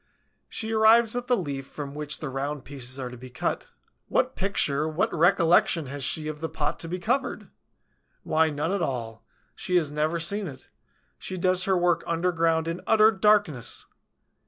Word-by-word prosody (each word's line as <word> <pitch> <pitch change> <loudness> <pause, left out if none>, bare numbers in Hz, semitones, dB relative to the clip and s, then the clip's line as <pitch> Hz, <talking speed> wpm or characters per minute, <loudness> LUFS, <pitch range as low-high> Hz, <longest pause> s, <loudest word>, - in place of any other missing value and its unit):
She 220 0 -5
arrives 225 +1 +5
at 245 0 -3
the 250 -1 +3
leaf 140 -7 -4
from 140 -1 -7
which 150 0 -4
the 150 - -3
round 135 +1 -4
pieces 130 -2 -3
are 130 -2 -4
to 125 - -9
be 130 +2 -11
cut. 125 - -3 0.4
What - - +1
picture, 155 -6 0
what 160 +4 -1
recollection 170 -1 +3
has 140 +1 -6
she 155 +3 -1
of 155 -1 -5
the 160 - -2
pot 150 -1 -2
to 165 - -5
be 180 +2 -3
covered? 245 +9 -2 0.7
Why, 160 0 +2
none 150 +3 -2
at 200 -2 -1
all; 115 -6 -3 0.3
she 180 - -2
has 160 -5 +2
never 155 +3 0
seen 200 +4 -1
it; 135 -4 -11 0.5
she 185 - -5
does 185 +1 +2
her 190 -1 +2
work 175 -1 +2
underground, 165 -1 +1
in 165 +2 -3
utter 220 0 +6
darkness! 200 - +1
165 Hz, 180 wpm, -26 LUFS, 145-185 Hz, 0.7 s, utter